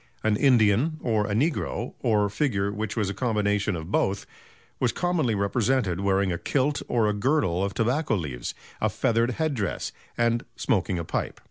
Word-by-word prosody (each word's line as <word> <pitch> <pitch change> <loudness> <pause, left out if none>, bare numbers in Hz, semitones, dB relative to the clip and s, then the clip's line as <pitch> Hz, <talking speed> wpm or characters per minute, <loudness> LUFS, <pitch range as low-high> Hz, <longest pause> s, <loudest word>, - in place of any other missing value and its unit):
An 110 -1 +3
"Indian" 125 +4 +3
or 110 -3 +1
a 100 - -1
"Negro" 150 +8 -1
or 110 -4 +2
a - - -1
figure 100 -5 0
which 110 +1 -4
was 105 -3 +1
a - - -4
combination 105 -3 0
of 80 +2 -6
both, 95 -1 +1 0.5
was 125 -2 +2
commonly 170 -11 0
represented 100 -1 +1
wearing 100 -1 +1
a 85 - -2
kilt 145 +1 0
or 115 -3 +2
a 105 - +1
girdle 105 - +1
of 100 -2 -2
tobacco 120 +2 +1
leaves, 70 -10 -4 0.3
a - - +2
feathered 115 +2 +1
head 155 +3 0
dress, 105 -8 -2 0.3
and 120 0 +2
smoking 90 - 0
a 85 - -2
pipe. - - -3
110 Hz, 175 wpm, -26 LUFS, 100-125 Hz, 0.5 s, An